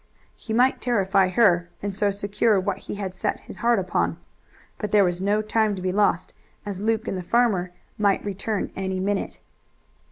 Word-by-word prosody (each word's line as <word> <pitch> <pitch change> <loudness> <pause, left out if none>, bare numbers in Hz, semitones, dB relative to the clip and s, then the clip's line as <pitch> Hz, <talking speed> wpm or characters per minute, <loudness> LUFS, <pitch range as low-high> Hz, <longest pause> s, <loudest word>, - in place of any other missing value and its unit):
He 225 - -9
might 250 +4 +3
terrify 195 -5 +2
her, 180 -4 +3
and 200 -1 -2
so 205 +1 +1
secure 200 +1 +1
what 190 0 -2
he - - -3
had 195 -2 -4
set 190 - -2
his - - -11
heart 235 +3 +2
upon. 185 -2 0 0.6
But 210 - -3
there 210 -1 +5
was 175 -1 0
no 205 +2 +1
time 215 -1 +1
to 185 - -7
be 185 - 0
lost, 205 +2 +1 0.3
as 200 -2 -5
Luke 220 0 0
and - - -2
the - - -3
farmer 190 -3 +1 0.3
might 200 -1 +2
return 205 +1 -3
any 190 -1 -2
minute. 200 +1 -2
200 Hz, 185 wpm, -24 LUFS, 190-215 Hz, 0.6 s, there